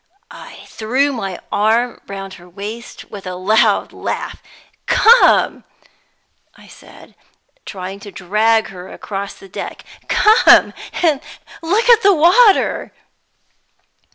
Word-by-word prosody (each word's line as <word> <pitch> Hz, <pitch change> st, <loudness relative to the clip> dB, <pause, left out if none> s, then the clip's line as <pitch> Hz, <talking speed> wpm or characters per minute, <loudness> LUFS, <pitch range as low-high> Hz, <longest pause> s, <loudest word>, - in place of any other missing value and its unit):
I -, -, -13 dB
threw 260 Hz, +6 st, -1 dB
my 195 Hz, -7 st, -5 dB
arm 230 Hz, +4 st, 0 dB
round 195 Hz, -1 st, -8 dB
her 175 Hz, -1 st, -15 dB
waist 210 Hz, +6 st, -9 dB
with 200 Hz, -2 st, -9 dB
a 180 Hz, -, -5 dB
loud 205 Hz, +4 st, +1 dB
laugh. -, -, -6 dB, 0.5 s
"Come," 470 Hz, +3 st, +4 dB, 0.9 s
I -, -, -18 dB
said, -, -, -17 dB, 0.5 s
trying 190 Hz, 0 st, -8 dB
to 200 Hz, 0 st, -11 dB
drag 215 Hz, +5 st, 0 dB
her 180 Hz, -1 st, -11 dB
across 200 Hz, -1 st, -7 dB
the 195 Hz, -, -15 dB
deck 185 Hz, -, -8 dB, 0.2 s
"come 430 Hz, +2 st, +4 dB, 0.3 s
and 300 Hz, -5 st, +2 dB, 0.4 s
look 400 Hz, +9 st, 0 dB
at 470 Hz, -2 st, +6 dB
the 400 Hz, -1 st, +4 dB
water." 385 Hz, +7 st, +3 dB
220 Hz, 115 wpm, -17 LUFS, 195-305 Hz, 0.9 s, at